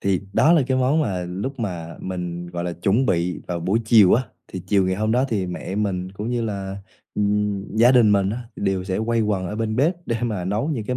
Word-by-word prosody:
Thì 95 -2 +1
đó 160 - +5
là 160 -5 +5
cái 130 -1 +1
món 130 +5 +2
mà 95 - -1
lúc 115 +10 -4
mà 85 -6 -4
mình, 90 -1 -5
gọi 85 0 -5
là, 90 - -2
chuẩn 100 +9 +1
bị 90 0 0
vào 85 -1 -3
buổi 100 +7 +1
chiều 110 -5 +6
á, 125 - +2 0.3
thì 95 -2 -6
chiều 95 -1 +3
ngày 95 - +1
hôm 110 +1 0
đó 125 +2 +3
thì 100 -5 -1
mẹ 90 +1 -5
mình 95 -3 -2
cũng 105 +4 -4
như 120 -1 -1
là, 100 -3 -4 0.4
ừm, 105 0 -1
gia 120 +3 +6
đình 115 -5 +5
mình 100 -1 +2
á 115 - -3 0.2
đều 95 -2 -1
sẽ 95 -1 -2
quây 115 -1 +1
quần 100 -4 0
ở 105 - -5
bên 110 -1 -2
bếp 155 +8 +3
để 115 - 0
mà 105 -7 -2
nấu 105 - -1
những 120 -9 -2
cái 125 +2 -2
100 Hz, 245 wpm, -22 LUFS, 95-115 Hz, 0.4 s, chiều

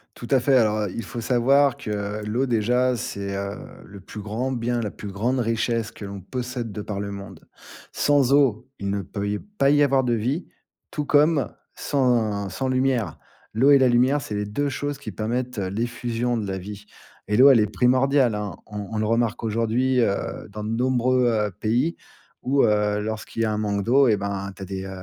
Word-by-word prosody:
Tout 120 - -9
à 135 - +5
fait. 130 +1 +3
Alors, 110 -2 +2
heu, 100 -3 -2
il 115 - -4
faut 120 -3 -6
savoir 135 +3 +3
que 105 0 -4
l'eau 120 +6 0
déjà, 125 +2 +2
c'est, 100 -3 -4
heu, 100 0 -3 0.3
le 100 -1 -12
plus 105 +3 -9
grand 115 +6 -3
bien, 120 -1 -1
la 105 - -2
plus 105 - -8
grande 120 +7 0
richesse 115 -1 -1
que 105 - -9
l'on 100 0 -7
possède 125 +2 -5
de 105 +1 -5
par 100 -1 -5
le 100 0 -4
monde. 100 0 -10 0.4
Sans 140 -2 +2
eau, 130 -4 +3
il 100 - -3
ne 100 0 -1
peut 100 +2 -4
y 105 - -1
pas 205 -10 0
y 145 0 +5
avoir 135 -1 +3
de 120 - +1
vie, 125 - -1 0.4
tout 150 - -3
comme 145 -2 +3 0.2
sans 115 -7 0
sans 130 +8 -3
lumière. 130 - 0 0.3
L'eau 130 +6 +4
et 140 - +8
la 130 -1 +4
lumière, 130 +4 +3
c'est 105 -4 -5
les 105 0 -1
2 140 +8 -1
choses 145 +1 -3
qui 110 -7 -7
permettent 120 +5 -3
l'effusion 120 +4 -2
de 105 -3 -3
la 95 - -3
vie. 100 +2 -8 0.4
Et 105 - +1
l'eau, 135 +3 +8
elle 125 - +6
est 105 - +3
primordiale, 130 +3 +3
hein. 105 -1 -4
On 105 -2 -7
on 110 - -3
le 110 - 0
remarque 115 0 0
aujourd'hui, 115 +4 +1
heu, 100 -4 -2
dans 105 +1 -7
de 105 - -4
nombreux, 125 +1 +2
heu, 105 -3 +1
pays 125 +10 +1 0.5
où, 135 +2 +2
heu, 105 -1 +2
lorsqu'il 110 +1 -4
y - - +3
a 110 - 0
un 105 - -1
manque 100 -1 -1
d'eau, 135 +5 +4
eh 110 - +4
ben 100 -1 -4
tu 95 - -13
as - - -5
des, 95 0 -5
heu - - -7
115 Hz, 215 wpm, -24 LUFS, 105-130 Hz, 0.5 s, et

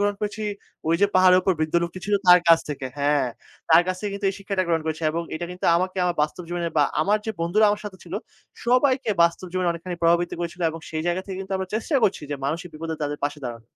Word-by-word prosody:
গ্রহণ 205 0 +1
করেছি 210 +1 -3 0.5
ওইযে 170 +5 +4
পাহাড়ের 185 0 +6
উপর 190 - +3
বৃদ্ধ 155 +1 -1
লোকটি 170 +2 -4
ছিল 205 - +2
তার 180 0 +9
কাছ 165 - +8
থেকে। 140 -2 -4
হ্যাঁ, 145 -2 +2 0.4
তার 165 +2 +8
কাছ 185 0 -1
থেকে 210 - -3
কিন্তু 200 0 -2
এই 190 - -8
শিক্ষাটা 195 -1 -1
গ্রহণ 165 -2 +1
করেছি 160 +1 -3
এবং 165 +2 -2
এটা 170 +2 -4
কিন্তু 180 0 -4
আমাকে 185 +2 -2
আমার 175 - +1
বাস্তব 155 +4 -2
জীবনে 175 -1 -2
বা 145 - +5 0.2
আমার 205 +7 +2
যে - - 0
বন্ধুরা 180 +6 +3
আমার 210 - -1
সাথে 195 -2 -7
ছিল, 175 - -7 0.5
সবাইকে 255 0 +2
বাস্তব 170 +2 +1
জীবনে 185 -1 0
অনেকখানি 170 +1 -6
প্রভাবিত 170 +1 +3
করেছিল 170 +1 -5
এবং 165 - -8
সেই 155 0 -3
জায়গা 175 +2 0
থেকে 190 - -5
কিন্তু 195 0 -6
আমরা 190 -1 -4
চেষ্টা 235 +7 0
করছি 195 - +2
যে, 145 - 0
মানুষের 170 +6 -2
বিপদে 160 +1 -4
তাদের 145 0 -2
পাশে 145 0 -3
দাঁড়ানো। 115 -1 -8
175 Hz, 235 wpm, -24 LUFS, 160-195 Hz, 0.5 s, তার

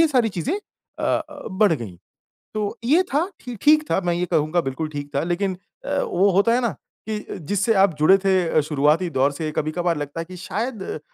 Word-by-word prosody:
ये 330 - +7
सारी 250 -6 +3
चीज़ें 285 - -1 0.4
अ - - -2
अ, 300 -2 -2
बढ़ 195 0 +3
गई। 110 - -5 0.6
तो 210 -1 -2
ये 300 +10 +4
था 320 +6 +2
ठी 245 -2 -7
ठीक 305 +1 +5
था, - - +3
मैं 175 -1 0
ये 175 +1 0
कहूँगा 160 +2 +2
बिल्कुल 135 +2 -3
ठीक 145 -1 -6
था 140 - +1
लेकिन 185 +2 -1 0.3
अ, - - -1
वो 290 - +2
होता 200 +5 +3
है 250 - +2
ना, 235 - +1 0.4
कि 215 - -1
अ, 210 - -8
जिससे 205 +3 +2
आप 195 -4 +3
जुड़े 190 +6 +6
थे 195 - +4 0.2
अ, 155 - +3
शुरुआती 150 +4 +2
दौर 135 0 +2
से 155 +1 -4
कभी-कभार 170 +2 0
लगता 145 +2 -5
है - - -6
कि 185 +2 -10
शायद 210 -2 -4
185 Hz, 215 wpm, -23 LUFS, 155-230 Hz, 0.6 s, ये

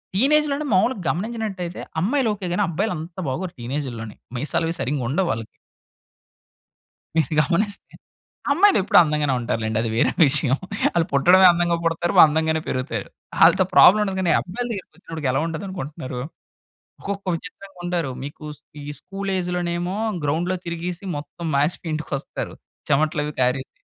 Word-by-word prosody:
టీనేజ్‌లోనే 295 +5 +2
మాములుగా 195 +3 +2
గమనించినట్టయితే, 195 -3 -3 0.2
అమ్మాయిలు 245 - +1
ఓకే 200 -2 -7
గాని, 205 - +1
అబ్బాయిలంత 175 -1 -3
బాగోరు 175 +7 -3
టీనేజుల్లోని. 120 -4 -5 0.2
మీసాలవీ 165 +4 -1
సరింగుండవు 145 +6 0
వాళ్ళకి... 115 0 -3 1.7
మీరు 160 -1 +1
గమనిస్తే. 200 +8 -2 0.6
అమ్మాయిలెప్పుడూ 325 - +4
అందంగానే 150 -3 +1
ఉంటారు 120 -1 -2
లెండి. 110 0 -1
అది 115 - -2
వేరే 115 - +3
విషయం. 135 -2 +3 0.4
ఆళ్ళు 170 -1 +2
పుట్టడమే 180 +7 +6
అందంగా 170 0 +1
పుడతారు, 165 +1 0
అందంగానే 160 +1 +3
పెరుగుతారు. 125 -5 -3 0.4
ఆళ్ళతో - - +6
ప్రాబ్లమ్ 210 +3 +8
ఉండదు. 195 -2 -3
కానీ, 175 - +2
అబ్బాయిల 205 +7 -4
దగ్గరికొచ్చినప్పటికి 165 -6 -6
ఎలా 135 - +1
ఉంటుందనుకొంటున్నారు? 155 -6 -5 0.8
ఒక్కొక్క 200 0 -5
విచిత్రంగుంటారు. 175 -4 -5
మీకు 145 +2 -9
స్ - - -33 0.2
ఈ - - -9 0.2
స్కూల్ 195 0 -5
ఏజ్‌లోనేమో, 175 0 -2 0.3
గ్రౌండ్‍లో 170 +6 0
తిరిగీసి, 170 +2 -4
మొత్తం 155 +3 -7
మాసిపోయి 155 +3 0
ఇంటికొస్తారు. 155 -3 -4 0.4
చెవట్లవి 150 +1 +1
కారేసి. 130 +1 0
170 Hz, 125 wpm, -22 LUFS, 145-190 Hz, 1.7 s, ప్రాబ్లమ్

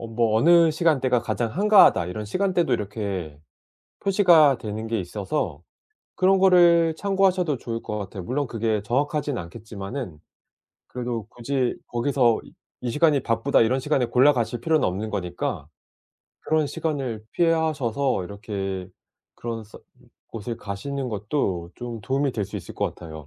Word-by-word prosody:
뭐 115 -2 +2
어느 170 +4 +5
시간대가 135 -7 +2
가장 115 -2 -2
한가하다." 200 - +5
이런 105 +4 -5
시간대도 180 - +1
이렇게 100 -7 -4 0.6
표시가 175 -8 +5
되는 110 +1 -5
게 115 -2 -1
있어서 95 - -3 0.5
그런 190 +1 +3
거를 170 -3 +5
참고하셔도 190 -6 +1
좋을 115 -1 -5
것 105 - -4
같아요. 95 -1 -7
물론 135 +8 -2
그게 110 -3 -1
정확하진 145 +3 -1
않겠지만은 100 - -7 0.7
그래도 120 -3 -4
굳이 125 +1 -2
거기서 120 -1 +2
이 - - -17 0.3
"이 125 - -3
시간이 150 +1 +3
바쁘다." 115 +4 +2
이런 125 +4 +2
시간에 135 -3 +1
골라가실 125 -1 +2
필요는 160 -3 +2
없는 100 +4 -4
거니까 90 -7 -3 0.8
그런 155 -1 +1
시간을 135 -9 -3
피하셔서 140 - +1
이렇게 95 -2 -5 0.5
그런 115 -1 -5
서 105 - -14 0.5
곳을 115 +1 -5
가시는 125 +6 -5
것도 100 - -2
좀 120 -2 -7
도움이 135 +5 0
될 105 -3 -2
수 - - -9
있을 - - -10
것 - - -1
같아요. 85 -3 -10
120 Hz, 325 characters per minute, -24 LUFS, 105-150 Hz, 0.8 s, 어느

